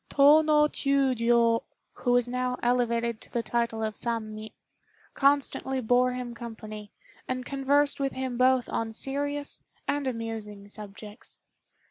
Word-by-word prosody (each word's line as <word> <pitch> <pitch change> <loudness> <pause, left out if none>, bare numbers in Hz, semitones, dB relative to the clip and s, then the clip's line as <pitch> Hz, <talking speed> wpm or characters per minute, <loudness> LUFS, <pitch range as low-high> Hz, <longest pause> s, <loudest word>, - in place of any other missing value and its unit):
Tô 295 +3 +6
no 300 -1 +4
Chiûjiô, 240 -5 +2 0.3
who 245 - -1
was 245 -1 +3
now 250 0 -1
elevated 235 -2 +1
to - - -14
the 235 - -1
title 235 -2 -1
of 215 -1 -1
Sammi, 220 -2 -4 0.6
constantly 275 -1 +2
bore 250 +1 +3
him 250 -1 -5
company, 215 -3 -8 0.4
and 255 0 -3
conversed 280 +2 +1
with 275 -1 -1
him 260 -1 -3
both 255 0 +3
on 225 0 -2
serious 285 +4 -3 0.3
and 285 -1 0
amusing 225 -4 -5
subjects. 210 +1 -7
245 Hz, 130 wpm, -28 LUFS, 225-270 Hz, 0.6 s, Tô